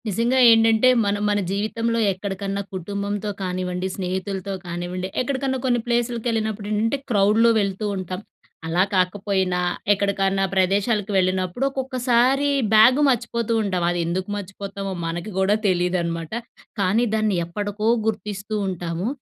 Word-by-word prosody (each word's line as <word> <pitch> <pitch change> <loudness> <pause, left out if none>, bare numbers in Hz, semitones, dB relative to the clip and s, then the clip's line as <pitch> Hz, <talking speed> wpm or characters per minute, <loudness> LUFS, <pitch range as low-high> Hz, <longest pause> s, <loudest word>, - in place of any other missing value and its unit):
నిజంగా 230 +5 +1
ఏంటంటే, 225 +2 +5 0.2
మనం 205 0 0
మన 205 0 +2
జీవితంలో 230 +3 -1
ఎక్కడికన్నా 195 +1 -4
కుటుంబంతో 200 +3 -3
కానివ్వండి, 180 0 -2
స్నేహితులతో 190 +1 -3
కానివ్వండి, 175 +1 -4
ఎక్కడికన్నా 265 0 -1
కొన్ని 245 -2 +2
ప్లేసులకి 235 -1 -1
వెళ్ళినప్పుడు 220 -2 -2
ఏంటంటే, 225 +5 +1
క్రౌడ్‌లో 215 +2 +4
వెళ్తూ 200 +1 -2
ఉంటాం. 185 0 -5 0.5
అలా 175 +3 +2
కాకపోయినా 185 0 0 0.3
ఎక్కడికన్నా 195 -1 +1
ప్రదేశాలకు 200 +3 +1
వెళ్ళినప్పుడు 185 +4 0
ఒక్కొక్కసారి 260 +1 +1 0.2
బ్యాగు 240 +6 +6
మర్చిపోతూ 235 -2 0
ఉంటాం. 185 -4 -1
అది 175 - -2
ఎందుకు 185 +2 -2
మర్చిపోతామో, 195 0 -6
మనకి 170 +5 -4
కూడా 195 +2 +3
తెలీదనమాట. 175 -2 -1 0.5
కానీ 200 +6 +2
దాన్ని 215 -3 +1
ఎప్పటకో 205 +4 -3 0.2
గుర్తిస్తూ 210 -1 -3
ఉంటాము. 175 0 -3
200 Hz, 120 wpm, -22 LUFS, 185-225 Hz, 0.5 s, బ్యాగు